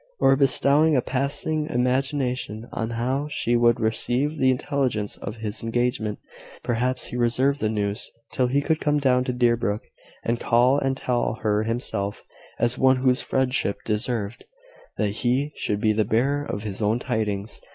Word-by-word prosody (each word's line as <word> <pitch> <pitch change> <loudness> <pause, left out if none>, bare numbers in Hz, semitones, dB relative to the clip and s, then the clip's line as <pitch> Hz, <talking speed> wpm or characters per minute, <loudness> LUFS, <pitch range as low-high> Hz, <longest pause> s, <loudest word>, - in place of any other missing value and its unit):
or 135 - +5
bestowing 140 +3 +4
a - - +4
passing 145 +4 -2
imagination 125 -2 -1
on 110 0 -3
how 130 +5 -1
she 120 -4 0
would 120 0 +4
receive 125 +7 0
the 130 - +4
intelligence 130 -5 -1
of 100 - -6
his 110 -1 -5
engagement! 115 -2 -1 0.5
Perhaps 125 +2 -1
he - - -7
reserved 125 +4 +2
the 110 - 0
news 105 0 -2 0.2
till 125 - +1
he 140 +3 +1
could 160 0 +1
come 150 0 +2
down 130 -3 +3
to 125 - -2
Deerbrook, 120 -4 +1 0.4
and 115 0 0
call 125 +4 +3
and 135 -1 -1
tell 120 -3 0
her 105 -1 +2
himself, 110 -3 -2 0.3
as 120 +1 0
one 130 0 +5
whose 130 0 +2
friendship 130 -6 0
deserved 110 0 -2 0.5
that 105 - +1
he 125 +7 0
should 105 - -2
be 110 +1 +2
the 110 0 +2
bearer 135 +7 +1
of 105 - -4
his 105 -1 -5
own 105 +2 +2
tidings. 105 -3 -2
120 Hz, 160 wpm, -24 LUFS, 110-135 Hz, 0.5 s, or